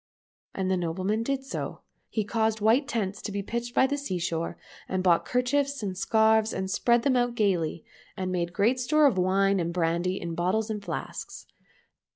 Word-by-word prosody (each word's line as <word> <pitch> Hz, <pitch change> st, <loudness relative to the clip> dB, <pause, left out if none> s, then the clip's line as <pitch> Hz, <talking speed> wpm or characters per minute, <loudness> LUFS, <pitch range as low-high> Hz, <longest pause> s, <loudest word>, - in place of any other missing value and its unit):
And 190 Hz, -1 st, -1 dB
the 190 Hz, -, +2 dB
nobleman 185 Hz, +5 st, -1 dB
did 270 Hz, +3 st, -2 dB
so. 270 Hz, -, -5 dB, 0.3 s
He 215 Hz, -, -1 dB
caused 220 Hz, +1 st, 0 dB
white 230 Hz, +7 st, +3 dB
tents 205 Hz, -6 st, -2 dB
to 210 Hz, -, -5 dB
be 200 Hz, 0 st, -3 dB
pitched 235 Hz, +3 st, -4 dB
by -, -, +5 dB
the 285 Hz, +2 st, -1 dB
sea 190 Hz, -10 st, -3 dB
shore, 165 Hz, -1 st, -2 dB, 0.3 s
and 185 Hz, -1 st, -1 dB
bought 175 Hz, -2 st, +3 dB
kerchiefs 275 Hz, +1 st, 0 dB
and 190 Hz, -2 st, -3 dB
scarves 220 Hz, +2 st, +3 dB
and 190 Hz, 0 st, -3 dB
spread 235 Hz, +3 st, +2 dB
them 265 Hz, -1 st, +2 dB
out 245 Hz, -1 st, +1 dB
gaily, 175 Hz, -7 st, 0 dB, 0.3 s
and 185 Hz, -1 st, -2 dB
made 175 Hz, -1 st, -1 dB
great 215 Hz, +7 st, +2 dB
store 305 Hz, +4 st, +3 dB
of 230 Hz, -10 st, +3 dB
wine 195 Hz, +1 st, +2 dB
and 170 Hz, -1 st, -1 dB
brandy 170 Hz, +2 st, 0 dB
in 170 Hz, -1 st, -4 dB
bottles 190 Hz, +6 st, 0 dB
and 210 Hz, -2 st, -4 dB
flasks. -, -, -6 dB
205 Hz, 190 wpm, -27 LUFS, 185-240 Hz, 0.3 s, by